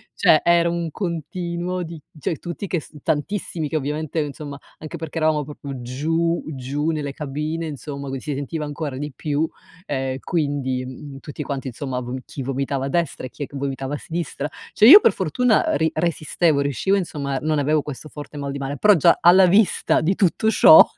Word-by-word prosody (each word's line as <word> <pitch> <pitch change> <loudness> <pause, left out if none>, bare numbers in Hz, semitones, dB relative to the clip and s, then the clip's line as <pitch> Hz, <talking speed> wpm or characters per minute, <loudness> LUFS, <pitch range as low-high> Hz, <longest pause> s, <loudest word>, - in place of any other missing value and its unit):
cioè - - +5
era 170 0 +4
un 170 -1 -2
continuo 175 +1 -3
di 165 -1 -8 0.2
cioè 150 +2 -2
tutti 175 +3 -5
che 175 - 0
s 150 - -15
tantissimi 160 -1 -2
che - - -4
ovviamente, 150 +2 -2
ehm, 150 - +1
insomma 145 0 -7 0.2
anche 160 +2 -7
perché 160 0 -5
eravamo 155 -1 +2
proprio 140 -2 -8
giù 165 +7 0
giù 145 +2 -2
nelle 150 -3 -2
cabine, 150 +3 -3
insomma 140 -1 -6
qui 135 -1 -4
si 150 - -3
sentiva 145 +3 -3
ancora 145 -2 -4
di 145 0 -5
più, 150 +1 0 0.4
ehm, 130 -2 -2
quindi, 140 -6 -1
mhmm, 135 +2 -9
tutti 150 +1 -7
quanti 135 -1 -4
insomma 130 0 -4
v 125 +1 -5
chi 135 - -7
vomitava 135 +1 -2
a - - -2
destra 170 -2 -1
e - - -14
chi 145 - -7
è - - -2
che 140 - -13
vomitava 135 0 -3
a - - -1
sinistra. 160 -3 -4 0.2
Cioè, 220 - +7
io 395 +8 +13
per 225 - +4
fortuna, 215 - +2
ehm, - - +2
ri 160 0 +1
resistevo, 160 -2 +1
riuscivo 140 +8 +1
insomma, 140 -7 -2
non 155 0 0
avevo 150 +1 +2
questo 150 +1 -7
forte 150 0 -9
mal 140 -1 -3
di 140 - -4
male, 140 +1 -4
però 210 -1 +6
già 170 +2 +4
alla 185 +2 +7
vista 195 +2 +3
di 175 +5 +1
tutto 205 +3 +2
ciò 315 +7 +9
150 Hz, 200 wpm, -22 LUFS, 140-170 Hz, 0.4 s, io